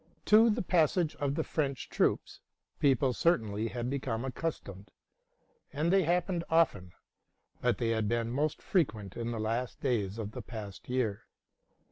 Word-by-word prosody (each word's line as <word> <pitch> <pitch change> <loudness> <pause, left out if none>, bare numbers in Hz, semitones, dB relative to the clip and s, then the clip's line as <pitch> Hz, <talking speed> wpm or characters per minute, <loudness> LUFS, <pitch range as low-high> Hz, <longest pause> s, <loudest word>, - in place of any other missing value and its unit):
'To 220 +2 +7
the 225 0 0
passage 170 -1 +2
of 140 -1 -1
the - - 0
French 140 -4 -2
troops - - 0 0.4
people 135 -2 +3
certainly 110 -9 +1
had 120 +1 -4
become 130 -3 -2
accus 155 +5 -3
tomed; 100 +1 -11 0.8
and 160 +5 0
they 195 -3 +4
happened 175 +1 0
often, 150 - +2 0.7
but - - +2
they 115 - 0
had 110 -2 0
been 115 +1 0
most 145 +4 -1
frequent 110 - 0
in 115 0 -3
the 115 -1 -3
last 115 +3 -2
days 110 -7 -1
of 110 -2 -4
the - - -6
past 105 -3 -9
year. 120 -5 -1
125 Hz, 155 wpm, -31 LUFS, 110-160 Hz, 0.8 s, To